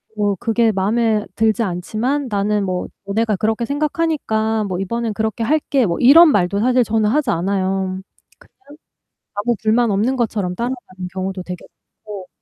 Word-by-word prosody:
"뭐 205 -1 0
그게 230 -1 +2
마음에 215 +2 +1
들지 225 +1 +2
않지만 220 +9 -2
나는 205 0 0
뭐 185 -1 -2 0.2
너네가 215 +2 0
그렇게 220 +3 0
생각하니까 285 -7 -1
뭐 185 -2 -3
이번엔 225 +3 -2
그렇게 220 +1 -2
할게." 280 -1 +1
뭐 170 -3 -1
이런 310 +6 +8
말도 200 -3 +1
사실 250 +3 +3
저는 220 -1 +1
하지 280 +2 +1
않아요. 190 +1 -1 0.4
그냥 300 -6 -19 0.6
아무 225 +4 0
불만 225 +1 +2
없는 215 +7 +1
것처럼 210 -7 -1
따라가는 235 -6 -5
경우도 190 0 -4
되게 180 -1 -8 0.4
많고 200 -3 -8
220 Hz, 340 characters per minute, -19 LUFS, 195-240 Hz, 0.6 s, 이런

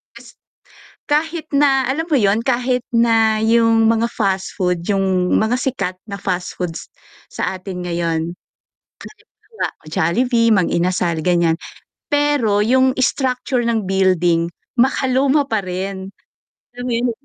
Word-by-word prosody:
kas - - -13 0.8
kahit 315 +2 -1
na 275 -2 +3
alam 320 +5 -2
mo 305 - +2
yun, 210 -2 +2
kahit 250 0 0
na 225 -2 +3
yung 230 0 +4
mga 230 +1 +2
fastfood, 190 -4 -1
yung 190 -2 +1
mga 225 +3 +1
sikat 195 -9 -2
na 200 - -5
fastfoods 180 -3 -4 0.4
sa 190 - -3
atin 185 -1 -7
ngayon. 170 -2 -1 0.8
Halimbawa, 445 +1 -8 0.2
Jollibee, 230 +9 +1
Mang 185 -3 +1
Inasal 170 -2 0
ganyan, 170 -2 +2 0.5
pero 290 -8 +2
yung 260 +4 +3
structure 255 -1 0
ng 225 -4 -1
building 175 -3 +2 0.3
makaluma 265 +3 +2
pa 220 -4 0
rin, 190 +1 -5 0.6
alam 245 - -6
mo 250 - -2
yun 240 +1 0
220 Hz, 120 wpm, -19 LUFS, 185-255 Hz, 0.8 s, yung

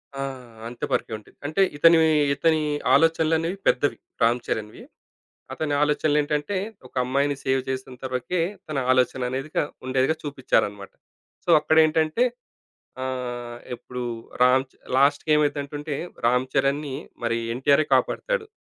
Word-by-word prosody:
ఆ! 135 - -4 0.5
అంత 120 - -11
పరకే - - 0
ఉంటుంది. 105 - -19
అంటే 155 +7 0 0.2
ఇతని 165 +2 +6 0.4
ఇతని 160 +2 +2 0.3
ఆలోచనలనేవి 165 +2 +2
పెద్దవి 145 +2 +2 0.2
'రామ్ 120 +2 +4
చరణ్‌' 105 -1 -2
వి. - - -12 0.7
అతని 150 -2 -2
ఆలోచనలు 150 0 +2
ఏంటంటే 150 +6 -2 0.3
ఒక - - -30
అమ్మాయిని 140 +2 +1
సేవ్ 130 0 +1
చేసెంతవరుకే 130 +4 -3 0.3
తన 150 - -2
ఆలోచననేది 130 +2 0
కా - - +3 0.2
ఉండేదిగా 130 +4 +1
చూపిచ్చారన్నమాట. 105 -8 -1 0.5
సో - - -6
అక్కడేంటంటే 160 +7 +3 0.8
ఆహ్, 120 -2 -4 0.2
ఎప్పుడు 125 +1 -8 0.4
రామ్ 130 +1 +5
చ - - -30 0.2
లాస్ట్‌కేమైందంటుంటే 145 +1 +1 0.3
'రామ్ 125 +2 +3
చరణ్‌' 135 +2 +2
ని 135 - -5 0.3
మరి 115 0 0 0.2
'ఎన్టీఆరే' 140 +4 +3
కాపాడతాడు. - - 0
140 Hz, 120 wpm, -24 LUFS, 125-155 Hz, 0.8 s, ఇతని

